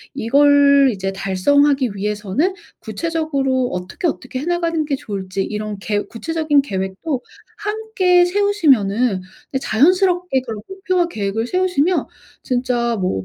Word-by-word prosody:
이걸 280 Hz, +2 st, +5 dB
이제 195 Hz, -1 st, -3 dB
달성하기 260 Hz, +8 st, +2 dB
위해서는 210 Hz, -, -1 dB, 0.2 s
구체적으로 280 Hz, -6 st, -1 dB
어떻게, 180 Hz, -, -3 dB
어떻게 260 Hz, -4 st, -4 dB
해 285 Hz, -, -5 dB
나가는 335 Hz, -2 st, 0 dB
게 285 Hz, -2 st, -1 dB
좋을지 195 Hz, -4 st, -4 dB
이런 210 Hz, 0 st, -4 dB
계 205 Hz, +1 st, -1 dB
구체적인 310 Hz, +2 st, 0 dB
계획도 195 Hz, -, -3 dB, 0.4 s
함께 415 Hz, -4 st, +2 dB
세우시면은 260 Hz, -, +2 dB, 0.3 s
네 265 Hz, -, 0 dB
자연스럽게 355 Hz, -, +2 dB
그런 225 Hz, -4 st, -7 dB
목표와 370 Hz, -2 st, -1 dB
계획을 220 Hz, -, -3 dB
세우시면 365 Hz, -1 st, +1 dB, 0.4 s
진짜 245 Hz, -2 st, 0 dB
뭐 180 Hz, -, -1 dB
270 Hz, 310 characters per minute, -19 LUFS, 210-335 Hz, 0.4 s, 이걸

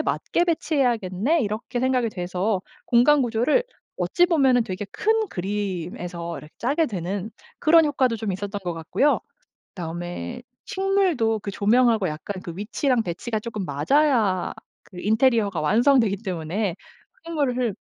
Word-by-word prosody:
맞게 345 Hz, -, 0 dB
배치해야겠네.' 270 Hz, -, +1 dB
이렇게 220 Hz, +4 st, -3 dB
생각이 255 Hz, -2 st, +1 dB
돼서 185 Hz, +1 st, -2 dB, 0.3 s
공간 275 Hz, +5 st, +5 dB
구조를 245 Hz, -, +2 dB, 0.3 s
어찌 350 Hz, -, +3 dB
보면은 265 Hz, -8 st, +3 dB
되게 190 Hz, +1 st, -5 dB
큰 440 Hz, -1 st, +1 dB
그림에서 180 Hz, -3 st, -4 dB
이렇게 150 Hz, -, -13 dB
짜게 290 Hz, +7 st, +1 dB
되는 195 Hz, -, -4 dB, 0.3 s
그런 325 Hz, +1 st, +6 dB
효과도 260 Hz, -5 st, +1 dB
좀 210 Hz, -2 st, -3 dB
있었던 200 Hz, +2 st, -4 dB
것 175 Hz, -, -1 dB
같고요. 165 Hz, -, +1 dB, 0.5 s
그다음에 175 Hz, +7 st, -6 dB, 0.2 s
식물도 375 Hz, -, +1 dB
그 205 Hz, -, -6 dB
조명하고 220 Hz, -1 st, +3 dB
약간 185 Hz, +5 st, -6 dB
그 170 Hz, -, -6 dB
위치랑 230 Hz, +5 st, 0 dB
배치가 215 Hz, +6 st, -3 dB
조금 215 Hz, -3 st, -5 dB
맞아야 200 Hz, -, +2 dB, 0.3 s
그 180 Hz, -, -12 dB
인테리어가 220 Hz, -4 st, +2 dB
완성되기 225 Hz, -, +3 dB
때문에 185 Hz, -1 st, -3 dB, 0.5 s
식물을 255 Hz, -, 0 dB
220 Hz, 320 characters per minute, -24 LUFS, 185-265 Hz, 0.5 s, 그런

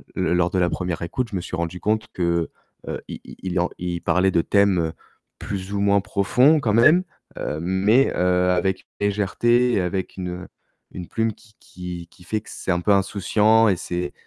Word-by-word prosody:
L 90 Hz, -2 st, 0 dB
lors 90 Hz, 0 st, +2 dB
de 90 Hz, +1 st, -1 dB
la 90 Hz, -, +2 dB
1re 90 Hz, -2 st, -3 dB
écoute, 115 Hz, +8 st, -3 dB
je -, -, -4 dB
me 90 Hz, -, -1 dB
suis 90 Hz, -, -5 dB
rendu 85 Hz, +1 st, -3 dB
compte 110 Hz, +2 st, 0 dB
que, 85 Hz, -2 st, 0 dB, 0.4 s
heu, -, -, -4 dB
il -, -, -7 dB
il 95 Hz, -1 st, -4 dB, 0.2 s
il 85 Hz, -1 st, -4 dB
parlait 95 Hz, +1 st, +2 dB
de 85 Hz, -, +3 dB
thèmes, 95 Hz, -4 st, +2 dB, 0.5 s
plus 100 Hz, 0 st, -5 dB
ou 100 Hz, -, -1 dB
moins 100 Hz, 0 st, +3 dB
profonds 125 Hz, +13 st, +3 dB
quand 110 Hz, -6 st, 0 dB
même. 155 Hz, +11 st, +5 dB, 0.3 s
Heu, 75 Hz, -, -3 dB
mais, 100 Hz, +9 st, +3 dB
heu, 90 Hz, 0 st, +2 dB
avec 95 Hz, +1 st, 0 dB
légèreté 105 Hz, +5 st, +2 dB
et 95 Hz, -, +2 dB
avec 95 Hz, +2 st, -3 dB
une 90 Hz, -1 st, -4 dB
heu, 90 Hz, 0 st, -7 dB, 0.4 s
une 90 Hz, -2 st, -8 dB
plume 115 Hz, -1 st, -1 dB
qui 105 Hz, +1 st, -23 dB
qui 90 Hz, -2 st, -8 dB
qui 90 Hz, -, -18 dB
fait 110 Hz, +4 st, -2 dB
que -, -, -16 dB
c'est -, -, -3 dB
un 90 Hz, 0 st, 0 dB
peu 105 Hz, -, +1 dB
insouciant 105 Hz, +3 st, +3 dB
et 95 Hz, -, +3 dB
c'est 90 Hz, 0 st, -4 dB
95 Hz, 200 wpm, -22 LUFS, 90-105 Hz, 0.5 s, même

